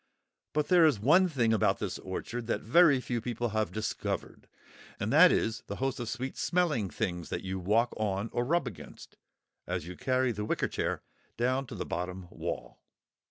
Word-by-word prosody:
But 150 Hz, -1 st, 0 dB
there 180 Hz, -2 st, +6 dB
is 150 Hz, -9 st, +4 dB
one 170 Hz, -, +5 dB
thing 120 Hz, -7 st, +2 dB
about 100 Hz, -2 st, +2 dB
this 95 Hz, -3 st, -4 dB
orchard 115 Hz, +5 st, -5 dB
that 110 Hz, -, -1 dB
very 145 Hz, +3 st, +5 dB
few 120 Hz, -2 st, -3 dB
people 120 Hz, 0 st, -2 dB
have 110 Hz, 0 st, -1 dB
discovered, 110 Hz, 0 st, -4 dB, 0.5 s
and 105 Hz, +4 st, -1 dB
that 170 Hz, +4 st, +8 dB
is 110 Hz, 0 st, 0 dB
the 100 Hz, -, -4 dB
host 135 Hz, +3 st, -2 dB
of 120 Hz, -2 st, -4 dB
sweet 130 Hz, +2 st, -4 dB
smelling 160 Hz, -, +1 dB
things 90 Hz, -6 st, -3 dB
that -, -, -3 dB
you 95 Hz, 0 st, -3 dB
walk 110 Hz, +6 st, +2 dB
on 105 Hz, 0 st, -1 dB
or 120 Hz, -, +1 dB
rub 170 Hz, +7 st, +1 dB
against, -, -, -10 dB, 0.5 s
as -, -, -2 dB
you 90 Hz, +1 st, -7 dB
carry 130 Hz, +4 st, +1 dB
the 105 Hz, -2 st, -4 dB
wicker -, -, 0 dB
chair -, -, -2 dB, 0.3 s
down 130 Hz, +3 st, 0 dB
to -, -, -7 dB
the -, -, -4 dB
bottom 90 Hz, +1 st, -4 dB
wall. -, -, -5 dB
115 Hz, 185 wpm, -30 LUFS, 105-135 Hz, 0.5 s, that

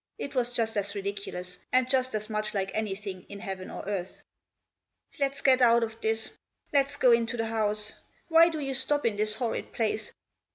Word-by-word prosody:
It 280 Hz, -, -5 dB
was 245 Hz, -2 st, +1 dB
just 225 Hz, -2 st, 0 dB
as 200 Hz, 0 st, -1 dB
ridiculous, 195 Hz, -2 st, -5 dB
and 255 Hz, 0 st, +4 dB
just 255 Hz, -2 st, +1 dB
as 215 Hz, 0 st, -3 dB
much 215 Hz, 0 st, -2 dB
like 195 Hz, -1 st, 0 dB
anything 200 Hz, -3 st, -3 dB
in 200 Hz, -, -7 dB
heaven 190 Hz, -1 st, -5 dB
or -, -, -6 dB
earth. 190 Hz, -2 st, -4 dB, 0.5 s
" -, -, -30 dB
Lefs 275 Hz, 0 st, 0 dB
get 260 Hz, -1 st, +5 dB
out 235 Hz, -1 st, +6 dB
of 225 Hz, 0 st, -5 dB
this; 220 Hz, 0 st, 0 dB, 0.4 s
let's 280 Hz, 0 st, +3 dB
go 250 Hz, -, +5 dB
into 235 Hz, 0 st, +2 dB
the 225 Hz, -, 0 dB
house; 215 Hz, -1 st, -1 dB, 0.3 s
why 330 Hz, 0 st, +7 dB
do 320 Hz, -, -4 dB
you 275 Hz, -2 st, -2 dB
stop 270 Hz, +2 st, +2 dB
in 225 Hz, -3 st, +2 dB
this 215 Hz, +1 st, +1 dB
horrid 240 Hz, -3 st, -2 dB
place 215 Hz, -1 st, -1 dB
225 Hz, 195 wpm, -28 LUFS, 205-255 Hz, 0.5 s, why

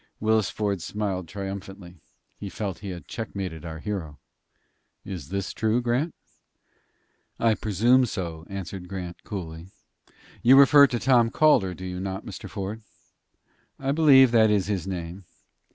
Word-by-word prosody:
Willis 110 Hz, -3 st, +2 dB
Ford 100 Hz, -4 st, -2 dB
smiled 95 Hz, -2 st, -3 dB
triumphantly. 95 Hz, -2 st, -8 dB, 0.4 s
He 100 Hz, -, -6 dB
felt 95 Hz, -3 st, -4 dB
that -, -, -21 dB
he 100 Hz, -, -6 dB
had 90 Hz, -2 st, -8 dB
checkmated 95 Hz, -7 st, -5 dB
our 80 Hz, -2 st, -6 dB
hero. 80 Hz, -6 st, -5 dB, 0.9 s
"Is 90 Hz, -8 st, -7 dB
this 100 Hz, 0 st, -3 dB
true, 110 Hz, +2 st, +1 dB
Grant?" 125 Hz, +7 st, -1 dB, 1.2 s
"I 115 Hz, -1 st, +3 dB
presume 115 Hz, +5 st, +3 dB
so," 85 Hz, -5 st, -5 dB
answered 95 Hz, -1 st, -6 dB
Grant, 90 Hz, -2 st, -7 dB
coolly. 85 Hz, -4 st, -7 dB, 0.7 s
"You 130 Hz, +3 st, +7 dB
refer 140 Hz, +1 st, +8 dB
to 125 Hz, -, -2 dB
Tom 120 Hz, -2 st, +3 dB
Calder, 115 Hz, -11 st, +3 dB
do 95 Hz, -, -8 dB
you 90 Hz, 0 st, -5 dB
not, 95 Hz, +1 st, -5 dB
Mr. 100 Hz, -1 st, -8 dB
Ford?" 100 Hz, +3 st, -5 dB, 1.0 s
"I 135 Hz, 0 st, -2 dB
believe 140 Hz, -5 st, +6 dB
that 110 Hz, -2 st, +5 dB
is 100 Hz, -3 st, +2 dB
his 100 Hz, -3 st, -2 dB
name." 90 Hz, 0 st, -5 dB
100 Hz, 145 wpm, -25 LUFS, 90-115 Hz, 1.2 s, refer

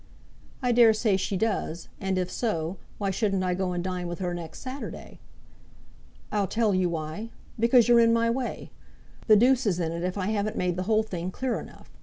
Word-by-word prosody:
"I 250 Hz, -, +2 dB
dare 235 Hz, -2 st, +6 dB
say 215 Hz, -2 st, +1 dB
she 190 Hz, +1 st, -1 dB
does; 185 Hz, -5 st, -2 dB
and 190 Hz, -1 st, -1 dB
if 180 Hz, -1 st, -1 dB
so, 185 Hz, -6 st, -2 dB, 0.2 s
why 200 Hz, -2 st, -1 dB
shouldn't 195 Hz, -1 st, 0 dB
I 180 Hz, -1 st, +1 dB
go 185 Hz, 0 st, -1 dB
and 175 Hz, -1 st, -2 dB
dine 180 Hz, -1 st, -3 dB
with 175 Hz, 0 st, -4 dB
her 180 Hz, -2 st, -2 dB
next 170 Hz, -2 st, -7 dB
Saturday?" 265 Hz, +2 st, -7 dB, 1.1 s
"I'll 205 Hz, -2 st, +1 dB
tell 220 Hz, +1 st, +1 dB
you 185 Hz, -1 st, +2 dB
why, 165 Hz, +7 st, -4 dB, 0.3 s
because 235 Hz, +1 st, +5 dB
you're 240 Hz, -1 st, +6 dB
in 230 Hz, 0 st, +5 dB
my 230 Hz, 0 st, +3 dB
way. 255 Hz, +1 st, -4 dB, 0.6 s
The 215 Hz, -, +8 dB
deuce 250 Hz, +3 st, +4 dB
is 180 Hz, -3 st, +1 dB
in 165 Hz, -2 st, -1 dB
it 170 Hz, 0 st, -4 dB
if 180 Hz, +2 st, -2 dB
I 195 Hz, 0 st, -1 dB
haven't 215 Hz, +1 st, -1 dB
made 180 Hz, -1 st, 0 dB
the 185 Hz, -, -2 dB
whole 220 Hz, 0 st, +4 dB
thing 180 Hz, -4 st, -4 dB
clear 255 Hz, +6 st, -2 dB
enough. -, -, -13 dB
195 Hz, 205 wpm, -27 LUFS, 180-230 Hz, 1.1 s, The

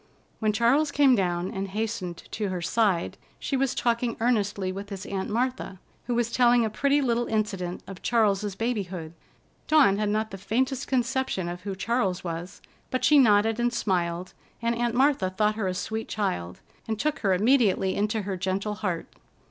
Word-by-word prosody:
When 215 Hz, -2 st, +2 dB
Charles 240 Hz, +8 st, +3 dB
came 285 Hz, -2 st, +4 dB
down 180 Hz, -4 st, 0 dB
and 195 Hz, +1 st, -3 dB
hastened 205 Hz, -3 st, -4 dB
to 210 Hz, -3 st, -2 dB
her 185 Hz, -1 st, -3 dB
side, 190 Hz, -1 st, 0 dB, 0.2 s
she 275 Hz, -, -2 dB
was 270 Hz, -1 st, 0 dB
talking 235 Hz, -1 st, 0 dB
earnestly 205 Hz, -5 st, 0 dB
with 200 Hz, +2 st, -7 dB
his 195 Hz, -2 st, -6 dB
Aunt 190 Hz, -1 st, -3 dB
Martha, 240 Hz, -4 st, -2 dB, 0.3 s
who 245 Hz, -, 0 dB
was 235 Hz, -1 st, 0 dB
telling 240 Hz, -1 st, +4 dB
a 220 Hz, -, -2 dB
pretty 280 Hz, +5 st, +2 dB
little 240 Hz, -1 st, +1 dB
incident 195 Hz, -5 st, -2 dB
of 195 Hz, -2 st, -10 dB
Charles's 210 Hz, -4 st, +1 dB
babyhood. 190 Hz, -8 st, -3 dB, 0.5 s
Dawn 275 Hz, -11 st, +5 dB
had 210 Hz, -1 st, 0 dB
not 215 Hz, +1 st, -1 dB
the 195 Hz, -, -7 dB
faintest 255 Hz, +7 st, -1 dB
conception 255 Hz, -7 st, 0 dB
of 175 Hz, +1 st, -5 dB
who 195 Hz, 0 st, -4 dB
Charles 195 Hz, -3 st, -1 dB
was, 170 Hz, +1 st, -6 dB, 0.3 s
but 255 Hz, -, 0 dB
she 300 Hz, -1 st, +6 dB
nodded 220 Hz, -2 st, +4 dB
and 240 Hz, 0 st, +2 dB
smiled, 180 Hz, -5 st, -1 dB, 0.3 s
and 235 Hz, 0 st, 0 dB
Aunt 235 Hz, 0 st, -1 dB
Martha 265 Hz, -7 st, +3 dB
thought 210 Hz, +3 st, +1 dB
her 215 Hz, -3 st, -2 dB
a 185 Hz, -, -2 dB
sweet 220 Hz, +4 st, -3 dB
child, 90 Hz, -, -3 dB, 0.3 s
and 220 Hz, -1 st, -2 dB
took 305 Hz, +3 st, 0 dB
her 195 Hz, -3 st, +2 dB
immediately 205 Hz, -3 st, +3 dB
into 210 Hz, +1 st, -1 dB
her 195 Hz, 0 st, -3 dB
gentle 190 Hz, +3 st, -2 dB
heart. 185 Hz, -5 st, -3 dB
215 Hz, 180 wpm, -26 LUFS, 190-240 Hz, 0.5 s, she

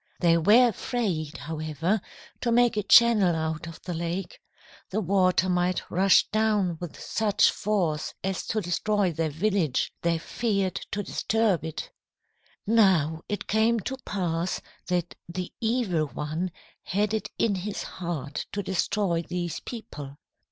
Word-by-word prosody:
"They 170 Hz, -2 st, +4 dB
were 215 Hz, +9 st, +6 dB
afraid, 180 Hz, -, -2 dB
however, 160 Hz, +5 st, -2 dB, 0.4 s
to 235 Hz, -, 0 dB
make 240 Hz, -1 st, +4 dB
a 210 Hz, -, +1 dB
channel 210 Hz, -4 st, +6 dB
out 160 Hz, 0 st, -2 dB
of 165 Hz, -, -9 dB
the 180 Hz, -, -4 dB
lake. 170 Hz, +2 st, -4 dB, 0.5 s
The 205 Hz, -, -1 dB
water 185 Hz, -2 st, +3 dB
might 180 Hz, 0 st, 0 dB
rush 190 Hz, +2 st, +5 dB
down 210 Hz, -6 st, +1 dB
with 175 Hz, -3 st, -7 dB
such 210 Hz, -2 st, +2 dB
force 175 Hz, -8 st, -1 dB
as 190 Hz, 0 st, -2 dB
to 220 Hz, -, 0 dB
destroy 195 Hz, +1 st, +1 dB
their 160 Hz, 0 st, -1 dB
village. 165 Hz, -3 st, 0 dB
They 170 Hz, -1 st, +1 dB
feared 195 Hz, 0 st, -1 dB
to 205 Hz, -, -1 dB
disturb 220 Hz, -5 st, +1 dB
it. 160 Hz, -1 st, -5 dB, 0.7 s
"Now, 185 Hz, -8 st, +3 dB
it 205 Hz, -, -3 dB
came 225 Hz, +2 st, +2 dB
to 265 Hz, +7 st, -4 dB
pass 180 Hz, -7 st, -2 dB, 0.3 s
that 175 Hz, -1 st, -1 dB, 0.2 s
the 180 Hz, +1 st, -5 dB
Evil 220 Hz, -9 st, +1 dB
One 155 Hz, +6 st, -3 dB, 0.3 s
had 205 Hz, +2 st, 0 dB
it 220 Hz, -, -2 dB
in 225 Hz, -, +2 dB
his 195 Hz, +2 st, -3 dB
heart 160 Hz, -5 st, -5 dB
to 205 Hz, -, -2 dB
destroy 190 Hz, -1 st, 0 dB
these 175 Hz, 0 st, -4 dB
people. 145 Hz, -, -8 dB
185 Hz, 140 wpm, -27 LUFS, 165-210 Hz, 0.7 s, were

